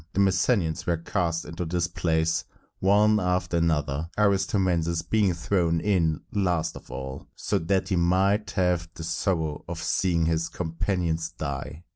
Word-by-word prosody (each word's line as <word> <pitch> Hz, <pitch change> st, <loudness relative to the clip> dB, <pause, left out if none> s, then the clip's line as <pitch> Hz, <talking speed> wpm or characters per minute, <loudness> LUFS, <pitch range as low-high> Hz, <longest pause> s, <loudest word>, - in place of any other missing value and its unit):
The -, -, -1 dB
Messenians 95 Hz, -3 st, +2 dB
were 85 Hz, -1 st, +2 dB
cast 85 Hz, 0 st, -1 dB
into 80 Hz, +3 st, -5 dB
this 85 Hz, +1 st, 0 dB
place 80 Hz, -1 st, 0 dB, 0.4 s
one 105 Hz, +2 st, +4 dB
after 90 Hz, -2 st, 0 dB
another, 80 Hz, -2 st, 0 dB
Aristomenes 95 Hz, -5 st, +1 dB
being 105 Hz, -4 st, +2 dB
thrown 85 Hz, -1 st, +1 dB
in 85 Hz, -5 st, +1 dB
last 90 Hz, -5 st, 0 dB
of -, -, -12 dB
all, 65 Hz, 0 st, -6 dB
so -, -, -1 dB
that 95 Hz, +3 st, 0 dB
he 95 Hz, -, +1 dB
might 95 Hz, +5 st, +2 dB
have 90 Hz, -3 st, +1 dB
the 80 Hz, -, -7 dB
sorrow 80 Hz, -2 st, -1 dB
of -, -, -5 dB
seeing 85 Hz, -3 st, +1 dB
his 80 Hz, +1 st, 0 dB
companions 85 Hz, -1 st, -2 dB
die. 75 Hz, 0 st, -5 dB
85 Hz, 145 wpm, -26 LUFS, 80-95 Hz, 0.4 s, one